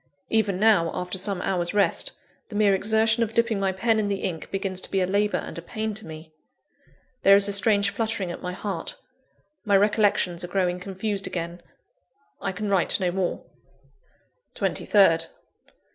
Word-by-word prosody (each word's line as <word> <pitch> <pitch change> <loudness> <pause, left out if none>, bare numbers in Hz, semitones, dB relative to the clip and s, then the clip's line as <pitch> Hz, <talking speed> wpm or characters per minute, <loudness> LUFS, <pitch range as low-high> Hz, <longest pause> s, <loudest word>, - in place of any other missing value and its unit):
Even 210 -4 +1
now, 210 -6 +4
after 180 +1 -3
some 190 -1 -3
hours' 175 0 -1
rest, 210 - +2 0.4
the 215 - -8
mere 205 -1 +4
exertion 220 +3 +2
of 225 -1 -1
dipping 230 -3 +2
my 195 -1 +1
pen 220 +4 +1
in 210 - 0
the 200 -1 -2
ink 165 -4 -4
begins 195 -1 -3
to - - -4
be 195 - 0
a 185 - +2
labour 205 +3 +1
and - - -6
a - - -8
pain 215 +5 -4
to 215 -3 -7
me. 155 0 -10 0.9
There 195 - +7
is 200 0 +4
a 200 - -1
strange 200 0 +2
fluttering 215 -3 -2
at - - -8
my 180 - -4
heart; 200 - -4 0.7
my 205 -3 +4
recollections 205 -4 +2
are - - -4
growing 180 -1 0
confused 195 +2 -3
again 170 0 -5 0.8
I 195 - -2
can 205 +3 -4
write 195 -2 +1
no 180 -2 0
more. 185 -1 -2 1.1
23rd. 165 -5 +3
195 Hz, 175 wpm, -25 LUFS, 180-210 Hz, 1.1 s, There